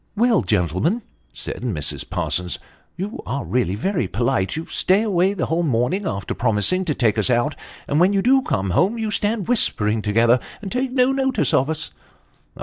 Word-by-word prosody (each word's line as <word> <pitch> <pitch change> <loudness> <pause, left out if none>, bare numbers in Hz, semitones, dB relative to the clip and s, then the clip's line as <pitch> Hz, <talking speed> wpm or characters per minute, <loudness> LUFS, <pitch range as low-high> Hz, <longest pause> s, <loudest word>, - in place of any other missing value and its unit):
" - - -42
Well, 230 -2 +3
gentlemen," 105 - 0 0.3
said - - -6
Mrs. - - -2
Parsons, 90 0 -1 0.2
" - - -38
you 205 +7 -5
are 140 - -3
really 120 -7 0
very 180 - -1
polite; 115 0 0
you 160 +1 -4
stay 195 +4 +2
away 195 -2 +1
the 175 - -1
whole 165 +2 0
morning, 160 - 0
after 100 - -3
promising 120 - +1
to 150 -5 -1
take 110 -3 +1
us 110 - +2
out, 125 +5 +1 0.3
and 145 - +1
when 180 +3 +5
you 195 -1 +1
do 265 +2 +4
come 95 - -1
home, 190 - +2
you 220 -2 -2
stand 210 -1 -1
whispering 110 - +1
together 115 +4 +3 0.2
and 195 -2 -7
take 255 +1 -1
no 255 0 +3
notice 265 - 0
of 135 +4 +3
us." 160 -1 -4
165 Hz, 190 wpm, -21 LUFS, -, 0.3 s, when